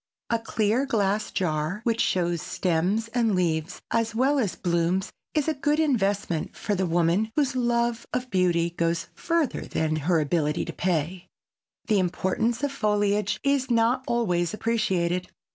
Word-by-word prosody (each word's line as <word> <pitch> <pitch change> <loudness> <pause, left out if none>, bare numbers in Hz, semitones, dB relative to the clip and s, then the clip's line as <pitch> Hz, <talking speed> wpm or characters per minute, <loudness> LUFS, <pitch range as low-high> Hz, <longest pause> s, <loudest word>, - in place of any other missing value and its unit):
A 230 - +2
clear 225 +3 0
glass 210 -4 0
jar 160 +2 -1
which 230 -1 +1
shows 175 -2 +1
stems 185 +8 0
and 230 -4 +1
leaves 170 -1 -1
as 225 -1 0
well 270 +4 +3
as 210 -8 0
blooms 175 +2 0 0.2
is 300 -1 +1
a 315 - +2
good 295 +2 0
investment 200 - 0
for 210 - -2
the 190 -2 0
woman 175 +5 +2
whose 280 -3 +1
love 235 -1 0
of 250 0 -3
beauty 175 -3 +2
goes 170 0 -1
further 335 -5 0
than 155 0 -1
her 165 +2 +2
ability 150 +1 0
to - - -6
pay. 175 +1 -1 0.6
The 210 -3 +2
importance 190 +7 0
of 285 - +1
foliage 210 -4 +1
is 280 -2 +1
not 235 +2 +2
always 180 -7 0
appreciated. 185 -6 0
205 Hz, 150 wpm, -26 LUFS, 175-235 Hz, 0.6 s, well